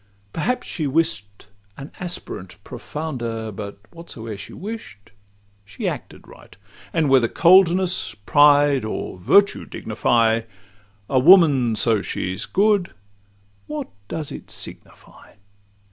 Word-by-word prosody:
Perhaps 250 Hz, +11 st, -2 dB
she 155 Hz, -5 st, -3 dB
wish'd 130 Hz, -10 st, -1 dB, 0.3 s
an 140 Hz, +2 st, -9 dB
aspirant 170 Hz, -, -6 dB
profounder; 120 Hz, -5 st, -5 dB
But 100 Hz, 0 st, -7 dB
whatsoe'er 115 Hz, -10 st, -9 dB
she 100 Hz, +1 st, -9 dB
wish'd, 200 Hz, -, -9 dB, 0.5 s
she 100 Hz, -2 st, -6 dB
acted -, -, -6 dB
right; -, -, -16 dB, 0.3 s
And 160 Hz, -2 st, +1 dB
whether 130 Hz, -3 st, +4 dB
coldness, 180 Hz, -, +3 dB
pride, 145 Hz, +5 st, +4 dB
or 110 Hz, -3 st, -5 dB
virtue 200 Hz, -, +3 dB
dignify 115 Hz, -1 st, 0 dB, 0.7 s
A 130 Hz, -, +2 dB
woman, 140 Hz, -, +6 dB
so 110 Hz, -1 st, +2 dB
she 95 Hz, -1 st, -4 dB
's -, -, -4 dB
good, 200 Hz, -2 st, +1 dB, 0.7 s
what 150 Hz, -7 st, -5 dB, 0.2 s
does 155 Hz, +1 st, -5 dB
it -, -, -9 dB
signify? -, -, -9 dB
135 Hz, 115 wpm, -21 LUFS, 110-170 Hz, 0.7 s, woman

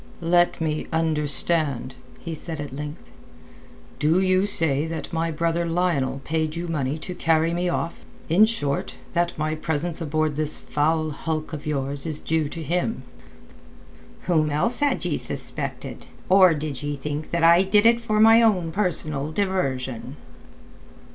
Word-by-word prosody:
"Let 175 Hz, +1 st, +3 dB
me 155 Hz, -2 st, -2 dB
understand," 155 Hz, -3 st, +1 dB, 0.3 s
he 165 Hz, -, -6 dB
said 160 Hz, 0 st, -6 dB
at 145 Hz, -2 st, -6 dB
length. 150 Hz, +2 st, -6 dB, 1.0 s
"Do 155 Hz, +5 st, +3 dB
you 185 Hz, +1 st, +2 dB
say 160 Hz, -6 st, +1 dB
that 160 Hz, 0 st, -6 dB
my 165 Hz, 0 st, 0 dB
brother 165 Hz, +2 st, 0 dB
Lionel 160 Hz, -6 st, 0 dB
paid 155 Hz, +1 st, -1 dB
you 170 Hz, +1 st, -4 dB
money 145 Hz, -3 st, -1 dB
to 180 Hz, +3 st, -6 dB
carry 165 Hz, -1 st, +1 dB
me 175 Hz, +1 st, 0 dB
off—in 170 Hz, +3 st, 0 dB
short, 145 Hz, -12 st, -1 dB, 0.2 s
that 175 Hz, 0 st, 0 dB
my 155 Hz, 0 st, -1 dB
presence 160 Hz, +2 st, -2 dB
aboard 155 Hz, -1 st, -1 dB
this 155 Hz, -1 st, 0 dB
foul 155 Hz, +1 st, 0 dB
hulk 155 Hz, +2 st, -4 dB
of 150 Hz, -1 st, -6 dB
yours 140 Hz, 0 st, -2 dB
is 155 Hz, -1 st, -1 dB
due 160 Hz, -2 st, -1 dB
to 165 Hz, +1 st, -6 dB
him?" 175 Hz, -2 st, -1 dB, 1.2 s
"Whom 155 Hz, -4 st, +1 dB
else 190 Hz, +12 st, 0 dB
had 290 Hz, -1 st, +1 dB
ye -, -, 0 dB
suspected? -, -, -4 dB, 0.2 s
Or 185 Hz, -3 st, +6 dB
did 145 Hz, -3 st, -4 dB
ye 145 Hz, 0 st, -3 dB
think 150 Hz, +2 st, -5 dB
that 170 Hz, -1 st, -1 dB
I 170 Hz, +2 st, +7 dB
did 205 Hz, +2 st, +3 dB
it 235 Hz, +1 st, +5 dB
for 215 Hz, -2 st, 0 dB
my 225 Hz, +1 st, +7 dB
own 185 Hz, -8 st, +2 dB
personal 155 Hz, -6 st, -1 dB
diversion?" 135 Hz, -, -2 dB
160 Hz, 150 wpm, -24 LUFS, 150-175 Hz, 1.2 s, I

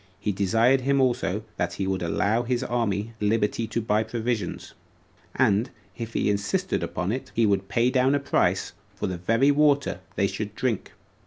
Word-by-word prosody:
He 105 Hz, -, -1 dB
desired 115 Hz, +7 st, +3 dB
him 140 Hz, +2 st, +2 dB
also, 120 Hz, -5 st, +1 dB
that -, -, -1 dB
he 95 Hz, -, -3 dB
would 95 Hz, -1 st, -1 dB
allow 100 Hz, +7 st, +1 dB
his 120 Hz, +1 st, -1 dB
army 115 Hz, -3 st, -1 dB
liberty 110 Hz, +1 st, +1 dB
to 115 Hz, +1 st, -2 dB
buy 110 Hz, -1 st, +1 dB
provisions; 110 Hz, -3 st, -3 dB, 0.6 s
and, 105 Hz, +5 st, +2 dB, 0.3 s
if 115 Hz, -1 st, -6 dB
he -, -, +1 dB
insisted 105 Hz, -, 0 dB
upon 90 Hz, +2 st, -2 dB
it, 130 Hz, +3 st, -4 dB
he 115 Hz, -, +3 dB
would 100 Hz, -2 st, +1 dB
pay 120 Hz, +2 st, +2 dB
down 130 Hz, +2 st, +3 dB
a -, -, +2 dB
price 140 Hz, -, 0 dB, 0.2 s
for -, -, -3 dB
the 90 Hz, -2 st, -3 dB
very 115 Hz, +10 st, +3 dB
water 145 Hz, -1 st, +2 dB, 0.2 s
they -, -, +2 dB
should -, -, -4 dB
drink. -, -, -2 dB
115 Hz, 175 wpm, -25 LUFS, 100-125 Hz, 0.6 s, desired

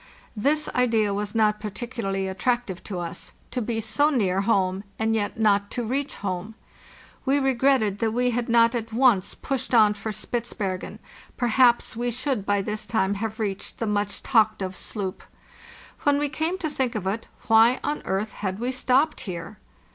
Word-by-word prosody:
~This 290 Hz, +8 st, +1 dB
idea 225 Hz, -5 st, +2 dB
was 205 Hz, +2 st, -3 dB
not 215 Hz, -1 st, +3 dB
particularly 205 Hz, -3 st, -3 dB
attractive 195 Hz, -1 st, -1 dB
to 195 Hz, -, -5 dB
us—to 175 Hz, +8 st, -5 dB
be 225 Hz, 0 st, -2 dB
so 225 Hz, +7 st, +2 dB
near 195 Hz, -9 st, +1 dB
home 195 Hz, -2 st, +1 dB
and 220 Hz, 0 st, +1 dB
yet 215 Hz, 0 st, -1 dB
not 205 Hz, -2 st, +3 dB
to 240 Hz, -2 st, -3 dB
reach 275 Hz, +5 st, -2 dB
home. 195 Hz, +2 st, -4 dB, 0.7 s
We 275 Hz, +1 st, +2 dB
regretted 260 Hz, -6 st, +2 dB
that 225 Hz, -, +1 dB
we 245 Hz, +2 st, +1 dB
had 240 Hz, 0 st, -2 dB
not 230 Hz, 0 st, +5 dB
at 230 Hz, -1 st, -3 dB
once 230 Hz, -5 st, +3 dB
pushed 265 Hz, -2 st, -2 dB
on 215 Hz, -2 st, +6 dB
for 210 Hz, +1 st, -5 dB
Spitzbergen; 210 Hz, -4 st, -3 dB, 0.4 s
per 245 Hz, -, 0 dB
haps 240 Hz, -1 st, +4 dB
we 240 Hz, +1 st, -1 dB
should 245 Hz, -3 st, -2 dB
by 205 Hz, -1 st, +2 dB
this 210 Hz, +1 st, -4 dB
time 200 Hz, -4 st, +1 dB
have 220 Hz, +2 st, -4 dB
reached 200 Hz, -3 st, -3 dB
the 230 Hz, -, -2 dB
much 205 Hz, -1 st, -1 dB
talked 215 Hz, -5 st, +3 dB
of 185 Hz, 0 st, -4 dB
sloop. 195 Hz, -1 st, -4 dB, 0.8 s
When 290 Hz, -1 st, +3 dB
we 290 Hz, 0 st, 0 dB
came 320 Hz, +5 st, -1 dB
to 325 Hz, -4 st, -2 dB
think 260 Hz, -5 st, -1 dB
of 205 Hz, -4 st, -3 dB
it, 200 Hz, +4 st, -2 dB, 0.2 s
why 225 Hz, +2 st, +5 dB
on 295 Hz, -, -2 dB
earth 200 Hz, +3 st, -1 dB
had 190 Hz, -2 st, -3 dB
we 245 Hz, +4 st, -1 dB
stopped 260 Hz, +4 st, +2 dB
here? 175 Hz, +4 st, -6 dB
220 Hz, 175 wpm, -25 LUFS, 200-245 Hz, 0.8 s, on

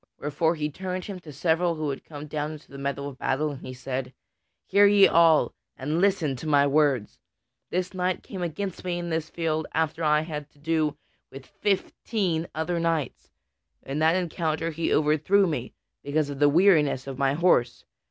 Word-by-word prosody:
Wherefore 155 Hz, +3 st, 0 dB
he 150 Hz, -1 st, -2 dB
turned 185 Hz, +2 st, -5 dB
him 195 Hz, -3 st, -6 dB
to 160 Hz, -4 st, -11 dB
several 165 Hz, +4 st, +1 dB
who 155 Hz, -2 st, -2 dB
had 135 Hz, -, -7 dB
come 145 Hz, -1 st, -9 dB
down 150 Hz, +1 st, -3 dB
into 155 Hz, -2 st, -13 dB
the 140 Hz, -, -9 dB
meadow 140 Hz, 0 st, -3 dB
of 135 Hz, -2 st, -9 dB
battle, 150 Hz, +3 st, 0 dB
and 140 Hz, -, -9 dB
he 130 Hz, -, -7 dB
said: 130 Hz, 0 st, -5 dB, 0.5 s
"Hear 200 Hz, +1 st, +5 dB
ye 200 Hz, -1 st, +7 dB
all, 165 Hz, -2 st, +4 dB, 0.2 s
and 150 Hz, +6 st, -1 dB
listen 185 Hz, -8 st, +2 dB
to 155 Hz, -, -7 dB
my 145 Hz, -2 st, +4 dB
words: 140 Hz, -6 st, +1 dB, 0.5 s
This 180 Hz, +1 st, -2 dB
knight 185 Hz, 0 st, -1 dB
came 190 Hz, -, -7 dB
against 175 Hz, +3 st, -4 dB
me 180 Hz, -1 st, -2 dB
in 175 Hz, -1 st, -4 dB
this 160 Hz, 0 st, -2 dB
field 160 Hz, -2 st, -2 dB
after 160 Hz, 0 st, 0 dB
I 150 Hz, 0 st, +3 dB
had -, -, -6 dB, 0.2 s
had -, -, -41 dB
to -, -, -27 dB
do 155 Hz, 0 st, 0 dB, 0.3 s
with 135 Hz, 0 st, -10 dB
fifteen 190 Hz, -, -1 dB
other 170 Hz, +2 st, -1 dB
knights. 165 Hz, -5 st, -2 dB, 0.5 s
In 135 Hz, +3 st, -4 dB
that 160 Hz, +2 st, +4 dB
encounter 165 Hz, -2 st, -1 dB
he 160 Hz, +1 st, -2 dB
overthrew 155 Hz, +7 st, +3 dB
me, 150 Hz, -8 st, -3 dB, 0.3 s
because 145 Hz, 0 st, -1 dB
of 140 Hz, -, -7 dB
the 145 Hz, 0 st, +5 dB
weariness 155 Hz, -6 st, +4 dB
of 135 Hz, -1 st, -7 dB
my 135 Hz, 0 st, +2 dB
horse. 125 Hz, -8 st, +2 dB
155 Hz, 190 wpm, -26 LUFS, 145-175 Hz, 0.5 s, ye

